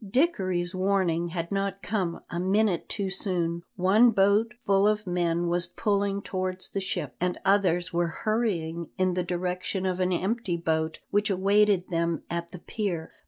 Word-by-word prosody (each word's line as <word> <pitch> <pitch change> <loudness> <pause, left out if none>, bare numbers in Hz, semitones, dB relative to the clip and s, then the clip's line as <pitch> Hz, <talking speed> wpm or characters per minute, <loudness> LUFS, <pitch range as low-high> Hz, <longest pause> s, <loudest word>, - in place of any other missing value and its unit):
Dickory's 190 - 0
warning 185 -3 +1
had 170 0 -4
not 195 0 -2
come 185 -4 -2
a 170 - -2
minute 190 0 +1
too 195 -3 -2
soon; 175 -3 -1
one 200 +6 +5
boat 210 +3 +3
full 195 +1 +4
of 210 0 +1
men 175 -1 0
was 175 +1 +2
pulling 200 -2 -1
towards 185 -1 -3
the 195 - -1
ship, 190 - -3
and 180 0 0
others 185 -3 +2
were 170 0 +1 0.2
hurrying 170 -7 -1
in 185 -1 +2
the 180 - 0
direction 180 +2 -2
of 185 -1 -1
an 185 0 +1
empty 190 0 -1
boat 160 -1 -1
which 205 +1 +2
awaited 200 0 +3
them 170 -2 -1
at 170 0 -3
the - - -8
pier. 180 -3 -4
185 Hz, 165 wpm, -27 LUFS, 175-200 Hz, 0.2 s, one